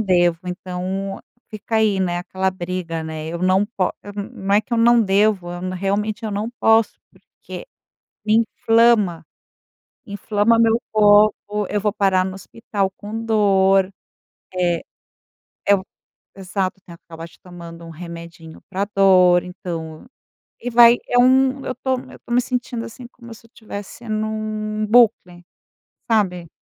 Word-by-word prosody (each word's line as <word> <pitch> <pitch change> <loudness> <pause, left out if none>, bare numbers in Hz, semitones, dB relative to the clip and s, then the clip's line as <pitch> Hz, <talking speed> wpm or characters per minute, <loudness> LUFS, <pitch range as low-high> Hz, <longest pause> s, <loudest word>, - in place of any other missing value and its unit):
devo. 175 -4 +2
Então, 185 +2 -4 0.3
fica 215 +1 -4
aí, 215 -3 +2
né, 175 -2 -1
aquela 190 +1 -2
briga, 175 -2 -4
né. 160 -1 -6
Eu 170 +1 -4
não 185 +2 +2
pó 200 -4 -1
eu, 205 - -9
hum, 205 0 -7
hum, 195 - +1
é 205 - +5
que 220 - -14
eu 235 - +2
não 235 +1 +5
devo, 195 -2 +1
eu 180 +1 -5
realmente 205 +4 -2
eu 215 - -3
não 205 +2 -3
posso 225 0 +3
porque - - -12 0.6
me 215 0 +3 0.3
inflama. 225 -8 +4 0.8
Inflama 210 +1 +1
meu 230 0 +3
corpo, 210 0 +3
eu 205 - -2
vou 210 0 +1
parar 195 -3 +2
no 190 0 -5
hospital 195 0 -4
com 220 +2 -6
dor, 195 -3 +3 0.6
eh 175 -2 0 0.9
eu 200 -2 +4 0.5
Exato, 190 0 -3
tem 170 - -11
que - - -24
acabar 165 0 -8
acho 170 - -17
tomando 170 -2 -11
um - - -10
remedinho 170 -1 -10
pra 195 +1 -2
dor, 185 -2 +5
então 170 -3 -7 0.6
E 245 - -4
vai 235 0 +7
é - - 0
um 265 +2 +3
eu 255 - -3
tô 260 -1 -1
eu - - -13
tô - - -9
me 245 - +5
sentindo 245 -2 -3
assim, 245 +2 -10
como 240 -1 -14
se 225 +1 -14
eu - - -30
tivesse 210 +1 -9
num 215 0 -3
bucle, 210 -6 +3 0.7
sabe? 180 -6 0
200 Hz, 155 wpm, -20 LUFS, 180-220 Hz, 0.9 s, vai